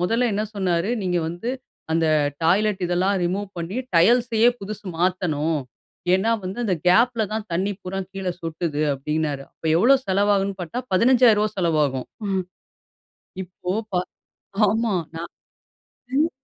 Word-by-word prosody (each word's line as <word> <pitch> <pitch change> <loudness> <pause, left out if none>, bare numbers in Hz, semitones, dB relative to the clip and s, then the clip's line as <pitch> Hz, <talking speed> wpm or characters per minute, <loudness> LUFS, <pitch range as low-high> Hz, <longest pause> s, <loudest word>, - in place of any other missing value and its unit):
முதல்ல 230 +7 +2
என்ன 210 +2 0
சொன்னாரு, 185 0 0
"நீங்க 180 -2 0
வந்து 175 +8 -4 0.4
அந்த 165 0 +2 0.4
டாய்லட் 190 +4 +2
இதெல்லாம் 185 +3 +1
ரிமூவ் 195 +3 -2
பண்ணி, 170 +5 -4 0.2
டைல்ஸையே 230 +5 +4
புதுசு 210 +1 -7
மாத்தணும், 165 -4 0 0.6
ஏன்னா 195 +5 +2
வந்து 185 +4 -5
அந்த 190 -5 +1
கேப்ல 235 +5 +4
தான் 215 -1 -3
தண்ணி 190 +4 0
பூரா 190 +1 -4
கீழ 195 -1 -4
சொட்டுது", 165 -2 -2
அப்டின்னாரு 150 0 -2
அப்போ 160 - -5
எவ்ளோ 255 +9 +6
செலவாகும்ன்னு 195 0 +1
பாத்தா 205 +9 -4
15,000 235 0 +5
ரூபாய் 215 -1 -1
செலவாகும். 150 -7 +1 0.2
ம், 190 -1 0 1.0
இப்போ 180 0 -6 0.2
பா 180 - +3 0.7
ஆமா 220 +1 +1 0.2
நான் 170 +1 -6 0.8
ம். 310 +4 +3
190 Hz, 130 wpm, -23 LUFS, 170-215 Hz, 1.0 s, எவ்ளோ